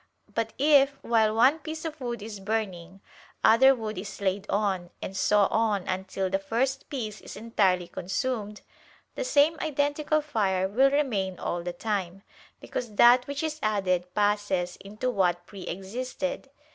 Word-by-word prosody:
But 225 -1 -2
if, 280 -1 +4
while 220 -2 +2
one 260 +8 +5
piece 315 0 -6
of 310 -2 -6
wood 240 -4 -4
is 215 -2 -7
burning, 195 -3 -4 0.4
other 265 +4 +7
wood 215 -5 -5
is 200 +2 -7
laid 200 +1 -1
on, 195 -4 0
and 190 - -6
so 205 +2 +3
on 215 -4 +1
until 190 0 -2
the 195 +1 0
first 250 +7 -1
piece 220 -7 -5
is - - -10
entirely 195 -5 +1
consumed, 210 +2 -3 0.5
the - - -3
same 315 -8 +3
identical 295 +1 0
fire 195 -10 0
will 260 +8 +4
remain 215 -11 0
all 175 - -3
the 175 +1 -4
time: 195 -1 -3 0.4
because 230 -4 -5
that 245 +3 +6
which 285 +2 -3
is 310 -1 -3
added 185 -4 0
passes 205 -4 +1
into 215 +6 -4
what 175 -5 +1
pre 195 -1 -10
existed. 250 +9 -4
215 Hz, 155 wpm, -27 LUFS, 190-260 Hz, 0.5 s, other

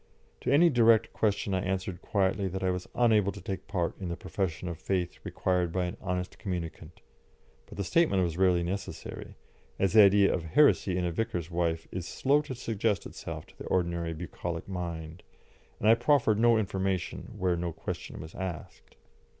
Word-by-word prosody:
To - - -1
any 165 +4 +6
direct 115 -2 +4
question 105 -2 0
I 95 - +1
answered 95 -2 -3
quietly 100 0 0
that 95 +1 -4
I 95 - +2
was 90 0 -4
unable 110 -5 +4
to 100 - -9
take 95 0 -5
part 90 -4 -1
in 95 -3 -4
the 85 - -3
profession 90 -3 -3
of 85 -2 -5
faith 90 +1 -2
required 90 -2 0
by 90 +1 0
an 90 - -4
honest 90 -1 -3
communicant, 85 -4 -5 0.7
but - - -12
the 100 - -1
statement 100 - +3
was 85 -2 -1
rarely 90 -1 +3
necessary, 95 +3 -5 0.4
as 95 -1 +1
the 110 - +9
idea 100 0 +6
of 90 - -1
heresy 90 - +3
in 90 - 0
a 85 - 0
vicar's 90 -4 -3
wife 85 -1 -1
is 90 -2 -4
slow 140 +2 +2
to 145 -3 -6
suggest 110 -3 -1
itself - - -7
to - - -21
the - - -7
ordinary 85 -2 0
bucolic 85 0 -5
mind, 85 -3 -5 0.6
and 105 - 0
I 110 - +9
proffered 120 -3 +3
no 115 0 +5
information 95 +1 -2
where 90 -3 +1
no 85 0 -2
question - - -6
was 80 +2 -9
asked. 90 -6 -7
95 Hz, 180 wpm, -29 LUFS, 85-105 Hz, 0.7 s, the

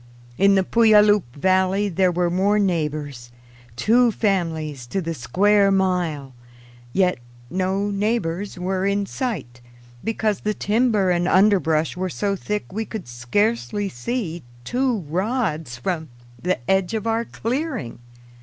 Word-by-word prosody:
In 195 +4 +4
the 190 - +3
Puyallup 210 -2 +5
valley 190 +5 +2
there 185 0 +2
were 175 0 0
more 195 +4 +2
neighbors 150 - -2 0.5
two 235 - +3
families 160 - -1
to 195 - -2
the 165 -2 -3
square 200 +10 +3
mile. 180 -8 0 0.6
Yet 185 -2 +1 0.3
no 190 +2 0
neighbors 200 -3 -1
were 185 +1 -1
in 200 0 0
sight, 175 - -4 0.4
because 215 -3 -1
the 210 0 -2
timber 210 -3 +2
and 175 0 +1
underbrush 180 -6 +3
were 185 +1 -2
so 195 +8 -1
thick 210 0 -4
we 220 +2 -2
could 220 - -7
scarcely 205 - -1
see 175 - -4 0.2
two 245 - 0
rods 170 - -2
from 160 +3 -3 0.3
the 185 +1 0
edge 190 +2 +1
of 220 - -3
our 225 0 +1
clearing. 250 - -4
190 Hz, 130 wpm, -22 LUFS, 165-210 Hz, 0.6 s, Puyallup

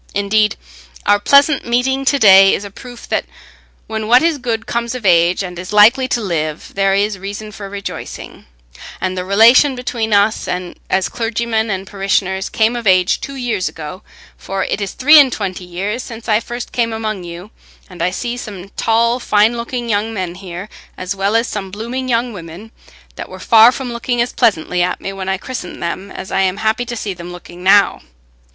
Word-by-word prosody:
Indeed, 210 +1 +2 0.5
our 205 0 +4
pleasant 280 +6 +4
meeting 265 +3 0
to 280 - +3
day 195 -5 +7
is - - -5
a 200 - -9
proof 245 +3 -11
that - - 0 0.6
when 220 -1 -4
what 245 +5 +5
is 330 -3 +1
good 230 -3 -3
comes 235 +1 -2
of 245 -4 -7
age 175 +1 +3
and 180 -2 -7
is 180 +2 -7
likely 225 +5 +5
to 245 - 0
live, 155 -6 -3
there 195 0 +2
is 200 0 0
reason 205 +2 -7
for 200 -1 -8
rejoicing, 200 0 -8 0.5
and 185 0 -2
the 180 - -3
relation 230 +8 +5
between 240 -3 -3
us 205 +1 +2 0.4
as 190 -1 +1
clergyman 225 -1 -2
and 190 -1 -3
parishioners 195 -1 -1
came 225 +2 +1
of 235 -3 -4
age 185 -1 +3
two 275 - -6
years 235 -8 -2
ago, 160 +4 -8 0.4
for 195 0 -3
it - - -3
is 200 - -3
three 300 +4 +7
and 270 -3 +5
twenty 185 -4 -4
years 195 +7 -3
since 230 -1 -10
I 215 -1 +3
first 240 +1 -7
came 230 -2 0
among 215 -4 -3
you, 175 +4 -9 0.4
and 180 -3 -10
I 175 - +2
see 240 +6 -4
some 200 -5 -8
tall 230 +3 +1
fine 215 0 +2
looking 235 +1 -4
young 220 +1 -1
men 185 -3 -3
here, 180 +1 -8 0.3
as 185 +2 -3
well 195 +2 0
as 230 +1 +2
some 195 -2 -5
blooming 240 +6 -5
young 235 0 0
women, 180 +4 -10 0.5
that - - -7
were - - -9
far 225 +1 +6
from 250 -1 -5
looking 240 +1 -2
as 240 +1 0
pleasantly 180 -6 +1
at 180 +1 0
me 195 - -5
when 190 -1 -5
I 190 - 0
christened 210 -6 -7
them 185 +3 -4
as 190 - -8
I 195 - +1
am 190 0 0
happy 220 +3 0
to 240 0 -5
see 205 -2 -4
them 175 0 -9
looking 175 0 -11
now. 195 +2 +4
210 Hz, 200 wpm, -17 LUFS, 190-235 Hz, 0.6 s, day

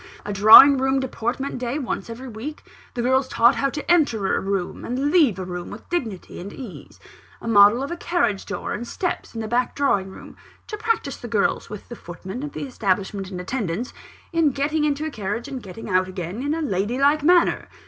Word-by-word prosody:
A 205 - -3
drawing 220 +8 +9
room 265 +1 +1
deportment 260 +1 -3
day 250 +2 -2
once 265 -4 -4
every 245 +3 -8
week 250 +7 -7 0.3
the 240 - -2
girls 260 +1 +2
taught 235 0 +4
how 275 +3 0
to 295 +4 -3
enter 240 - +2
a - - 0
room 195 -2 -3
and 265 +4 -1
leave 295 - +4
a 185 - -5
room 180 -1 -6
with - - -10
dignity 230 - -4
and 195 +3 -7
ease 240 -6 -10 0.4
a - - -8
model 215 +3 +6
of 280 - -5
a - - -2
carriage 285 - -1
door 200 - -4
and 235 +2 -5
steps, 355 -6 -4
in 225 - -3
the 220 - -4
back 240 +2 0
drawing 200 -9 +1
room, 190 - -12 0.3
to 425 - -5
practise 435 - -2
the 240 - -8
girls 215 -3 0
(with 210 -1 -9
the 240 - -8
footman 190 +5 -8
of 295 0 -6
the - - -5
establishment 195 -5 -2
in 185 -2 -6
attendance) 205 +2 -3 0.4
in 330 -3 +3
getting 295 +3 0
into 295 +1 -1
a 315 - -3
carriage 215 +2 -4
and 270 -3 -6
getting 200 +2 -9
out 185 -1 +2
again, 185 +3 -5
in 290 +3 -1
a 325 - -2
lady 205 -1 -1
like 285 +3 +3
manner! 345 +3 +3
240 Hz, 210 wpm, -23 LUFS, 200-280 Hz, 0.4 s, drawing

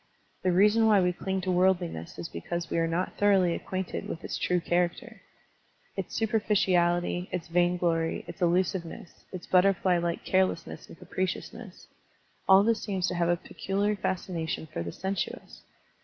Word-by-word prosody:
The 185 - +2
reason 210 +5 +4
why 210 -2 +5
we 180 -1 +2
cling 190 +1 -3
to 185 0 -1
worldliness 175 - 0
is 85 - -5
because 170 - -5
we - - +1
are 165 - +1
not 170 +3 -1
thoroughly 195 -4 +4
acquainted 185 +1 -4
with 165 - -6
its - - -4
true 180 0 +1
character. 175 0 -1 0.7
Its - - -5
superficiality, 185 -5 +1
its 180 -2 -4
vainglory, 175 -1 +1
its - - -10
illusiveness, 175 -1 -1
its 185 -2 -7
butterfly 185 -1 +3
like 170 0 -3
carelessness 185 -3 0
and - - -13
capriciousness, 185 +2 -5 0.3
— - - -33
all 190 +1 +8
this 225 0 +1
seems 190 -3 -1
to - - -3
have 170 0 +1
a 175 - +2
pectxliar 200 +4 -2
fascination 170 -5 -3
for - - -3
the 85 0 -4
sensuous. 190 - -4
180 Hz, 155 wpm, -28 LUFS, 170-190 Hz, 0.7 s, all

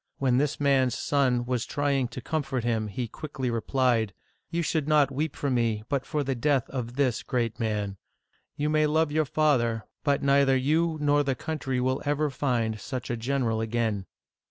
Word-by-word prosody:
When 130 -2 +2
this 145 0 0
man's 135 -3 +3
son 130 -4 +1
was 125 -2 -1
trying 140 -3 0
to 120 +1 -8
comfort 135 -4 -2
him, 115 -2 0
he 115 +4 -4
quickly 130 0 -4
replied: 115 -3 +1 0.3
You 170 0 -1
should 155 -2 0
not 150 -3 +4
weep 150 +2 -2
for 140 - -1
me, 115 -4 +1
but 140 -2 -1
for 150 -1 -1
the 135 0 -1
death 135 +1 +1
of 125 -2 -4
this 130 -4 +1
great 120 -2 -2
man. 105 -3 -2 0.6
You 145 - -1
may 155 0 +3
love 155 0 +2
your 155 +1 +2
father, 135 -7 +1 0.2
but 140 -2 +1
neither 140 -1 +4
you 160 +5 +1
nor 145 0 +3
the 135 -2 0
country 135 -2 -3
will 130 +1 0
ever 145 0 0
find 120 -5 -1
such 125 0 -5
a - - 0
general 115 -2 0
again 110 -3 -1
130 Hz, 180 wpm, -27 LUFS, 120-145 Hz, 0.6 s, not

